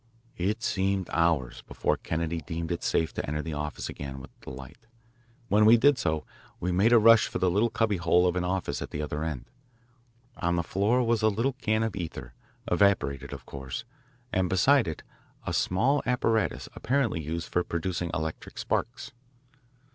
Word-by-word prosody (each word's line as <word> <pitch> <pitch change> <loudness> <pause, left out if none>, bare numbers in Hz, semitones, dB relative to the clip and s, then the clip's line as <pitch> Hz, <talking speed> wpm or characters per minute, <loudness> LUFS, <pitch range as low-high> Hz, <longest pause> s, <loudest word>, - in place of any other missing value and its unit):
It 105 +6 -1
seemed 95 -1 0
hours 80 -7 +1
before - - -1
Kennedy 80 0 -3
deemed 80 +3 -4
it 85 - -2
safe 80 - 0
to - - -3
enter 75 +1 -2
the 80 - -4
office 75 0 -4
again 70 -1 -6
with 65 - -11 0.2
a - - -4
light. 65 - -11 0.6
When 105 0 +4
we 110 +2 +8
did 140 +2 +4
so, 80 -5 -1 0.3
we 90 - -1
made 100 +6 +3
a 120 - +8
rush 115 0 +6
for - - -4
the 90 -1 +2
little 105 +6 +2
cubby 110 -3 +1
hole 85 +1 +3
of 90 0 +1
an 90 - 0
office 95 +1 -2
at - - -5
the 75 - -5
other 75 +1 -3
end. 75 -6 -4 0.9
On 85 -1 0
the 85 - 0
floor 105 +9 +1
was 115 -1 +1
a 110 - +4
little 115 +6 0
can 110 -4 0
of 110 -2 -2
ether, 80 -9 -6 0.3
evaporated 95 -9 +2
of - - -8
course, 65 - -6 0.5
and 95 -1 +1
beside 125 +5 +4
it 80 - -5 0.4
a - - -2
small 130 +10 +2
apparatus 115 -4 +1
apparently 125 -10 0
used 80 +3 -4
for 90 - +1
producing 85 0 -2
electric 80 0 -5
sparks. 120 +3 -2
90 Hz, 180 wpm, -28 LUFS, 80-110 Hz, 0.9 s, we